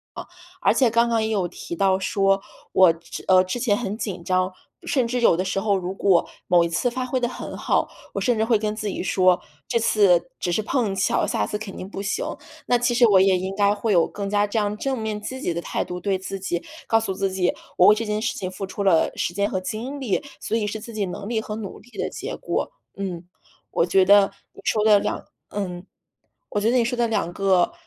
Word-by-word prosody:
呃， -, -, -6 dB, 0.4 s
而 -, -, +4 dB
且 255 Hz, -3 st, +4 dB
刚 235 Hz, +1 st, +3 dB
刚 225 Hz, -1 st, +1 dB
也 220 Hz, -, -1 dB
有 195 Hz, -5 st, 0 dB
提 170 Hz, -, -8 dB
到 190 Hz, +1 st, +3 dB
说， 195 Hz, 0 st, +2 dB, 0.3 s
我， 185 Hz, -3 st, +6 dB, 0.3 s
呃， 185 Hz, -1 st, +6 dB
之 185 Hz, +7 st, -3 dB
前 220 Hz, -5 st, +2 dB
很 210 Hz, -2 st, -3 dB
紧 190 Hz, -7 st, -4 dB
张， 185 Hz, +1 st, 0 dB, 0.3 s
甚 260 Hz, -4 st, +2 dB
至 245 Hz, +1 st, -1 dB
有 230 Hz, -, +5 dB
的 185 Hz, -, 0 dB
时 190 Hz, +1 st, -1 dB
候 205 Hz, 0 st, +1 dB
如 185 Hz, 0 st, -3 dB
果 195 Hz, -3 st, +3 dB, 0.2 s
某 175 Hz, -1 st, +5 dB
一 170 Hz, -, -1 dB
次 245 Hz, +8 st, 0 dB
发 255 Hz, +1 st, -3 dB
挥 255 Hz, 0 st, -1 dB
得 240 Hz, -, 0 dB
很 240 Hz, -, -7 dB
好， -, -, +1 dB, 0.2 s
我 -, -, -2 dB
甚 245 Hz, -4 st, +2 dB
至 220 Hz, -, +2 dB
会 225 Hz, -2 st, +3 dB
跟 210 Hz, 0 st, -2 dB
自 215 Hz, -1 st, -4 dB
己 195 Hz, -, -3 dB
说， 185 Hz, -1 st, +3 dB, 0.3 s
这 -, -, +1 dB
次 205 Hz, -3 st, +3 dB
只 175 Hz, -, -1 dB
是 215 Hz, -, +1 dB
碰 225 Hz, -4 st, 0 dB
巧， 190 Hz, -, +1 dB
下 -, -, 0 dB
次 210 Hz, -, -3 dB
肯 210 Hz, -2 st, -8 dB
定 185 Hz, -, -7 dB
不 195 Hz, -, -6 dB
行。 200 Hz, -, -2 dB, 0.4 s
那 245 Hz, -, +4 dB
其 245 Hz, 0 st, +1 dB
实 240 Hz, 0 st, +5 dB
我 190 Hz, -2 st, +6 dB
也 190 Hz, -1 st, +4 dB
应 190 Hz, +1 st, -3 dB
该 205 Hz, 0 st, +3 dB
会 220 Hz, +1 st, -1 dB
有 170 Hz, -4 st, +4 dB
更 200 Hz, 0 st, -5 dB
加 205 Hz, 0 st, +2 dB
这 220 Hz, -, -3 dB
样 210 Hz, 0 st, 0 dB
正 265 Hz, +2 st, -2 dB
面 215 Hz, -1 st, -3 dB
积 260 Hz, +5 st, -6 dB
极 175 Hz, -, -1 dB
的 170 Hz, -, -3 dB
态 -, -, -2 dB
度， 180 Hz, 0 st, -6 dB
对 195 Hz, 0 st, 0 dB
自 195 Hz, +1 st, -6 dB
己 175 Hz, -2 st, -3 dB, 0.2 s
告 225 Hz, -, +4 dB
诉 220 Hz, -4 st, -1 dB
自 195 Hz, +1 st, -1 dB
己， 185 Hz, -1 st, 0 dB, 0.2 s
我 180 Hz, -, +6 dB
为 210 Hz, -, +9 dB
这 225 Hz, -, -3 dB
件 210 Hz, 0 st, -1 dB
事 225 Hz, -, -2 dB
情 185 Hz, -, -3 dB
付 195 Hz, +1 st, -5 dB
出 200 Hz, +1 st, -4 dB
了 165 Hz, -4 st, +4 dB
时 175 Hz, -, -1 dB
间 200 Hz, +2 st, 0 dB
和 185 Hz, -, 0 dB
精 240 Hz, +9 st, -5 dB
力， 240 Hz, 0 st, -1 dB, 0.2 s
所 220 Hz, -, -2 dB
以 225 Hz, -2 st, 0 dB
是 210 Hz, +1 st, -3 dB
自 230 Hz, +2 st, -10 dB
己 210 Hz, -2 st, -1 dB
能 185 Hz, +2 st, -6 dB
力 225 Hz, -1 st, -1 dB
和 215 Hz, 0 st, -5 dB
努 205 Hz, -3 st, -7 dB
力 -, -, -19 dB
的 -, -, -1 dB
结 -, -, -6 dB
果。 -, -, -2 dB, 0.2 s
嗯， 180 Hz, -3 st, -5 dB, 0.4 s
我 -, -, +2 dB
觉 190 Hz, +1 st, +4 dB
得 200 Hz, 0 st, +6 dB, 0.2 s
你 -, -, -14 dB
说 215 Hz, -1 st, +1 dB
的 210 Hz, -1 st, +7 dB
两 -, -, -2 dB, 0.2 s
嗯， 185 Hz, -3 st, -4 dB, 0.6 s
我 205 Hz, -, -1 dB
觉 225 Hz, -, +2 dB
得 255 Hz, -, +3 dB
你 235 Hz, -, +3 dB
说 245 Hz, +1 st, -1 dB
的 235 Hz, -1 st, +2 dB
2 205 Hz, -6 st, -1 dB
个， 190 Hz, -, +2 dB
205 Hz, 265 characters per minute, -23 LUFS, 185-225 Hz, 0.6 s, 为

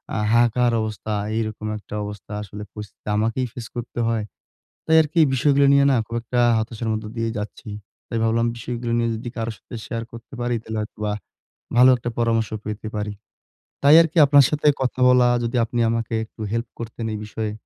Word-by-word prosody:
আ -, -, 0 dB, 0.2 s
হাহাকার 120 Hz, +1 st, +3 dB
অবস্থা। 110 Hz, 0 st, -4 dB, 0.2 s
এইরকম 110 Hz, -1 st, -3 dB
একটা 105 Hz, 0 st, -9 dB
অবস্থা 105 Hz, 0 st, -8 dB
আসলে 105 Hz, +1 st, -8 dB
পরিস্থিতি 105 Hz, -1 st, -11 dB
আমাকেই 115 Hz, +4 st, 0 dB
ফেস 120 Hz, -, -7 dB
করতে 120 Hz, 0 st, -5 dB
হয়। 115 Hz, -2 st, 0 dB, 0.6 s
তাই 160 Hz, -, +4 dB
আরকি 155 Hz, +2 st, -1 dB, 0.2 s
বিষয়গুলো 140 Hz, +1 st, +3 dB
নিয়ে 140 Hz, 0 st, +5 dB
না -, -, +3 dB
খুব 115 Hz, -, -6 dB
একটা 120 Hz, +1 st, -2 dB, 0.2 s
হতাশার 110 Hz, +1 st, -3 dB
মধ্যে 110 Hz, 0 st, -4 dB
দিয়ে 115 Hz, 0 st, 0 dB
যাচ্ছি। 105 Hz, +1 st, -7 dB, 0.4 s
তাই 115 Hz, -, -2 dB
ভাবলাম 115 Hz, +1 st, +2 dB
বিষয়গুলো 120 Hz, 0 st, -4 dB
নিয়ে 115 Hz, 0 st, +1 dB
যদি 120 Hz, +2 st, -6 dB
কারো 115 Hz, 0 st, -2 dB
সাথে 120 Hz, -, -11 dB
শেয়ার 115 Hz, -1 st, -4 dB
করতে 115 Hz, +2 st, -12 dB
পারি 120 Hz, 0 st, 0 dB
তাহলে 110 Hz, -1 st, -5 dB
হয়তোবা 105 Hz, 0 st, -4 dB, 0.7 s
ভালো 125 Hz, +2 st, +8 dB
একটা 120 Hz, -, -5 dB
পরামর্শ 115 Hz, -2 st, +1 dB, 0.2 s
পেতে 105 Hz, +1 st, -5 dB
পারি। 105 Hz, 0 st, -3 dB, 0.7 s
তাই 140 Hz, +2 st, +7 dB
আরকি 165 Hz, 0 st, -4 dB
আপনার 140 Hz, 0 st, +7 dB
সাথে 150 Hz, 0 st, -1 dB
কথা 130 Hz, 0 st, -1 dB
বলা। 125 Hz, -1 st, +5 dB, 0.2 s
যদি 115 Hz, +2 st, -2 dB
আপনি 120 Hz, +1 st, -2 dB
আমাকে 115 Hz, 0 st, -2 dB
একটু 110 Hz, -, -19 dB
হেল্প 115 Hz, +1 st, -2 dB
করতেন 115 Hz, 0 st, -5 dB
এই -, -, -4 dB
বিষয়ে, 105 Hz, 0 st, -4 dB
115 Hz, 185 wpm, -22 LUFS, 110-125 Hz, 0.7 s, ভালো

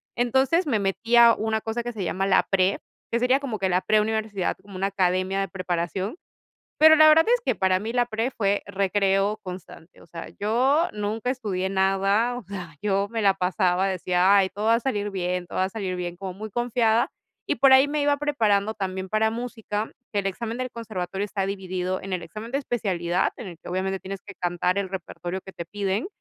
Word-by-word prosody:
Entonces 265 Hz, +8 st, +2 dB
me 225 Hz, -6 st, +1 dB
metí 195 Hz, +5 st, 0 dB
a 235 Hz, -1 st, +8 dB
una 220 Hz, 0 st, -1 dB
cosa 225 Hz, +1 st, -3 dB
que 240 Hz, 0 st, -5 dB
se 200 Hz, -4 st, -4 dB
llama 190 Hz, +2 st, -1 dB
la 190 Hz, -, +4 dB
pre, 190 Hz, 0 st, +2 dB, 0.3 s
que 235 Hz, -, +1 dB
sería 255 Hz, +3 st, +3 dB
como 250 Hz, -7 st, -4 dB
que 190 Hz, -1 st, 0 dB
la 180 Hz, +1 st, +2 dB
pre-universidad, 215 Hz, -2 st, 0 dB
como 200 Hz, -1 st, -13 dB
una 195 Hz, +1 st, 0 dB
academia 185 Hz, 0 st, 0 dB
de 195 Hz, -, -1 dB
preparación. 185 Hz, -, -3 dB, 0.6 s
Pero 315 Hz, 0 st, +8 dB
la 310 Hz, 0 st, +7 dB
verdad 320 Hz, +1 st, +6 dB
es -, -, +2 dB
que -, -, +2 dB
para 190 Hz, -1 st, +2 dB
mí 225 Hz, +3 st, -4 dB
la 245 Hz, -1 st, +2 dB
pre 225 Hz, +3 st, -2 dB
fue 200 Hz, -3 st, 0 dB
recreo 195 Hz, +1 st, +1 dB
constante, 180 Hz, -2 st, -10 dB
o -, -, -17 dB
sea, 165 Hz, 0 st, -8 dB
yo 260 Hz, -, +2 dB
nunca 215 Hz, +3 st, -2 dB
estudié 200 Hz, -7 st, -2 dB
nada, 195 Hz, +5 st, +2 dB
o 245 Hz, -, -7 dB
sea, 180 Hz, -5 st, -8 dB
yo 200 Hz, -1 st, +1 dB
me 225 Hz, -1 st, -2 dB
la 195 Hz, -1 st, +4 dB
pasaba, 185 Hz, 0 st, +1 dB
decía: 185 Hz, +1 st, +2 dB
"Ay, 190 Hz, -1 st, +4 dB
todo 205 Hz, +2 st, -5 dB
va 230 Hz, +1 st, +5 dB
a -, -, +1 dB
salir 205 Hz, -6 st, -2 dB
bien, 180 Hz, -1 st, -2 dB
todo -, -, -6 dB
va 185 Hz, -, +3 dB
a -, -, -4 dB
salir 195 Hz, -4 st, -4 dB
bien". 175 Hz, -1 st, -5 dB
Como 190 Hz, -1 st, -6 dB
muy 215 Hz, +3 st, -7 dB
confiada, 235 Hz, -1 st, +1 dB, 0.4 s
y -, -, +1 dB
por 270 Hz, -1 st, +5 dB
ahí 265 Hz, +2 st, +7 dB
me 295 Hz, 0 st, -1 dB
iba 285 Hz, 0 st, +2 dB
preparando 220 Hz, -8 st, +1 dB
también 190 Hz, -2 st, -4 dB
para 220 Hz, +1 st, +2 dB
música. 225 Hz, -3 st, -4 dB, 0.2 s
Que 205 Hz, -, +1 dB
el 195 Hz, -, -4 dB
examen 230 Hz, +4 st, -4 dB
del 255 Hz, -1 st, -4 dB
conservatorio 195 Hz, -4 st, -4 dB
está 195 Hz, -1 st, -2 dB
dividido 185 Hz, -1 st, -3 dB
en 195 Hz, -1 st, -5 dB
el 175 Hz, -2 st, -3 dB
examen 215 Hz, +7 st, -8 dB
de 275 Hz, -, +1 dB
especialidad, 185 Hz, -8 st, -1 dB
en 230 Hz, -, -7 dB
el 170 Hz, -3 st, -9 dB
que -, -, -10 dB
obviamente 190 Hz, +1 st, -2 dB
tienes 195 Hz, 0 st, -7 dB
que 200 Hz, -, -9 dB
cantar 175 Hz, +1 st, -1 dB
el 190 Hz, -2 st, -3 dB
repertorio 185 Hz, 0 st, -5 dB
que 190 Hz, -, -12 dB
te 170 Hz, -, -7 dB
piden, 200 Hz, -, -2 dB
200 Hz, 215 wpm, -25 LUFS, 185-230 Hz, 0.6 s, a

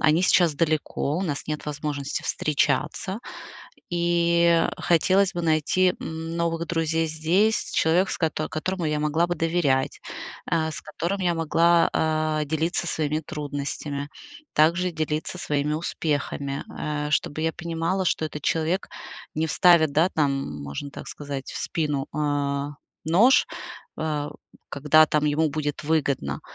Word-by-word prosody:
Они 155 Hz, +2 st, +4 dB
сейчас 175 Hz, -4 st, +4 dB
далеко, 155 Hz, -1 st, 0 dB
у -, -, -1 dB
нас 150 Hz, -7 st, -3 dB
нет 150 Hz, -1 st, -3 dB
возможности 145 Hz, -1 st, -3 dB
встречаться. 150 Hz, +6 st, 0 dB, 0.7 s
И 170 Hz, -1 st, +3 dB
хотелось 185 Hz, +3 st, +3 dB
бы 175 Hz, -, -2 dB
найти 165 Hz, +3 st, +2 dB
новых 165 Hz, +1 st, -3 dB
друзей 165 Hz, -1 st, 0 dB
здесь, 170 Hz, +8 st, +1 dB
человек, 175 Hz, +4 st, +3 dB
с -, -, -2 dB
кото 155 Hz, -2 st, -1 dB
которому 175 Hz, +2 st, -2 dB
я 150 Hz, -1 st, 0 dB
могла 150 Hz, +3 st, +2 dB
бы 175 Hz, -, -1 dB
доверять, 160 Hz, -5 st, +1 dB, 0.5 s
э, 160 Hz, -1 st, +1 dB
с -, -, -6 dB
которым 170 Hz, +6 st, -3 dB
я 175 Hz, -2 st, +1 dB
могла, 165 Hz, +1 st, +3 dB
а, 155 Hz, -1 st, +1 dB
делиться 160 Hz, +4 st, -1 dB
своими 155 Hz, -2 st, -1 dB
трудностями, 145 Hz, -1 st, -4 dB, 0.5 s
также 170 Hz, +4 st, +3 dB
делиться 155 Hz, +1 st, -2 dB
своими 150 Hz, -2 st, -1 dB
успехами. 145 Hz, -3 st, -2 dB
Э, 150 Hz, -1 st, -2 dB
чтобы 155 Hz, 0 st, 0 dB
я 160 Hz, 0 st, +1 dB
понимала, 170 Hz, +4 st, -2 dB
что 160 Hz, -, +1 dB
этот 150 Hz, -1 st, -6 dB
человек 165 Hz, +5 st, 0 dB, 0.5 s
не 160 Hz, +1 st, 0 dB
вставит, 160 Hz, -1 st, +5 dB
да, 160 Hz, +5 st, +4 dB
там, 135 Hz, -, -1 dB
можно 70 Hz, -, -6 dB
так -, -, -9 dB
сказать, 140 Hz, -2 st, -6 dB
в -, -, -6 dB
спину, 150 Hz, -4 st, -1 dB
э, 145 Hz, -1 st, 0 dB, 0.4 s
нож, 200 Hz, -, +5 dB, 0.5 s
э, 150 Hz, -2 st, -2 dB, 0.4 s
когда 150 Hz, +2 st, +5 dB
там 150 Hz, 0 st, +1 dB
ему 155 Hz, +2 st, +2 dB
будет 150 Hz, 0 st, -3 dB
выгодно. 140 Hz, -, 0 dB
155 Hz, 135 wpm, -25 LUFS, 150-170 Hz, 0.7 s, вставит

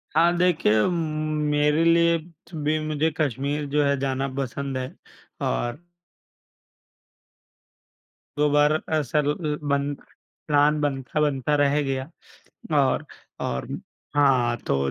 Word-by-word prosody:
हाँ 170 Hz, +2 st, +4 dB
देखिए, 155 Hz, -12 st, +3 dB
मेरे 155 Hz, -2 st, 0 dB
लिए 170 Hz, 0 st, +4 dB
त 165 Hz, +1 st, -16 dB
भी 155 Hz, +1 st, +1 dB
मुझे 155 Hz, +1 st, 0 dB
कश्मीर 145 Hz, +1 st, -1 dB
जो 145 Hz, +1 st, +2 dB
है 140 Hz, 0 st, +2 dB
जाना 135 Hz, 0 st, -1 dB
पसंद 135 Hz, 0 st, -3 dB
है। 130 Hz, 0 st, -3 dB, 0.6 s
और 120 Hz, -, -3 dB, 2.5 s
2 150 Hz, -, +3 dB
बार 150 Hz, +1 st, +4 dB, 0.2 s
असल 150 Hz, 0 st, 0 dB, 0.4 s
बन 140 Hz, 0 st, +1 dB, 0.5 s
प्लान 150 Hz, 0 st, +3 dB
बनता, 135 Hz, 0 st, -2 dB
बनता 145 Hz, 0 st, +1 dB
रह 145 Hz, +1 st, +3 dB
गया 135 Hz, +1 st, -3 dB, 0.7 s
और 140 Hz, +2 st, +2 dB, 0.4 s
और 65 Hz, 0 st, -2 dB, 0.5 s
हाँ, 130 Hz, -5 st, +3 dB
तो 70 Hz, -, +2 dB
145 Hz, 110 wpm, -24 LUFS, 135-155 Hz, 2.5 s, हाँ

